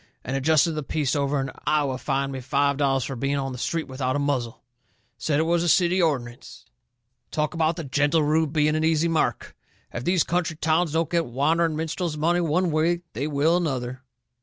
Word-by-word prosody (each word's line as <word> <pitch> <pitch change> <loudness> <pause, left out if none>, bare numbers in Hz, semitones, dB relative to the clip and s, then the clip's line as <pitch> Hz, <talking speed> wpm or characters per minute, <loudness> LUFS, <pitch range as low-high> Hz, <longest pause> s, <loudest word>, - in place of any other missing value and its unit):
and 130 - -3
a 135 - -1
justice 160 +3 +4
of - - -5
the 155 - -2
peace 145 0 -1
over 140 0 0
in 135 0 -3 0.2
Iowa 145 -4 +1
fined 135 0 -1
me 135 - -5
five 140 +2 +1
dollars 135 -2 +1
for 135 - -5
being 135 +4 -1
on 135 -1 -2
the 125 - -7
street 165 +4 -2
without 130 -1 -2
a - - +1
muzzle. 130 -4 -2 0.6
Said 150 -2 0
it - - +3
was 170 +1 +1
a 175 - +1
city 180 +2 +3
ordinance. 125 -7 -3 0.6
Talk 150 +1 -1
about 165 -1 +1
the 165 - -5
gentle 145 +3 +1
Rube 155 0 +1
being 155 0 +2
an 155 - 0
easy 160 0 +2
mark! 165 -1 -1 0.4
If 120 - -4
these 175 +1 +2
country 175 -2 -1
towns 160 +1 +1
don't 165 0 +1
get 170 - +1
the 145 - -7
wandering 155 +6 +1
minstrel's 160 +1 -3
money 170 +3 +2
one 170 +2 +1
way 165 +3 +1
they 135 +6 -2
will 155 +3 +2
another!" 130 -7 -2
150 Hz, 210 wpm, -24 LUFS, 135-165 Hz, 0.6 s, justice